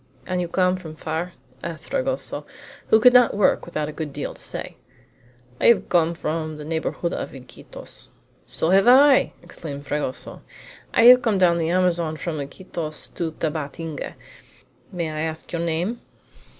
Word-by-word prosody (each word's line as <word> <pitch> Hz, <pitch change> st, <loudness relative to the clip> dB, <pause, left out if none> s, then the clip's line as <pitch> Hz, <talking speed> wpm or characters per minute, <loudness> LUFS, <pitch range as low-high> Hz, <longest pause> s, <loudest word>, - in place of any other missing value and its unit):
"And 180 Hz, -1 st, -1 dB
you 175 Hz, -, -2 dB
come 180 Hz, +1 st, +1 dB
from 160 Hz, -4 st, -9 dB
far?" 160 Hz, +3 st, -4 dB, 0.3 s
asked 165 Hz, -2 st, -7 dB
Fragoso, 270 Hz, -1 st, -1 dB, 0.4 s
who 220 Hz, -, +5 dB
could 250 Hz, +2 st, +7 dB
not 245 Hz, -4 st, +5 dB
work 205 Hz, -, +2 dB
without 155 Hz, -3 st, -3 dB
a -, -, -5 dB
good 155 Hz, -1 st, -5 dB
deal 145 Hz, +1 st, -5 dB
to -, -, -13 dB
say. -, -, -6 dB, 0.8 s
"I -, -, +3 dB
have 235 Hz, -, +4 dB
come 170 Hz, -1 st, +2 dB
from 155 Hz, -1 st, -3 dB
the 150 Hz, -, -8 dB
neighborhood 165 Hz, +2 st, -2 dB
of -, -, -5 dB
Iquitos." 130 Hz, -1 st, -13 dB, 0.4 s
"So 165 Hz, -, -1 dB
have 195 Hz, +3 st, +5 dB
I!" 270 Hz, +2 st, +6 dB
exclaimed 145 Hz, -3 st, -8 dB
Fragoso. 145 Hz, -4 st, -4 dB, 0.5 s
"I -, -, +3 dB
have 250 Hz, +1 st, +9 dB
come 220 Hz, -5 st, +1 dB
down 175 Hz, -2 st, +4 dB
the 165 Hz, 0 st, 0 dB
Amazon 170 Hz, -3 st, +1 dB
from 155 Hz, 0 st, -4 dB
Iquitos 155 Hz, +2 st, -7 dB
to 165 Hz, -2 st, -3 dB
Tabatinga. 155 Hz, 0 st, -4 dB, 0.8 s
May 170 Hz, -3 st, -3 dB
I 155 Hz, -, -5 dB
ask 160 Hz, 0 st, -4 dB
your 170 Hz, -, -2 dB
name?" 170 Hz, +8 st, -2 dB
170 Hz, 165 wpm, -23 LUFS, 155-185 Hz, 0.8 s, have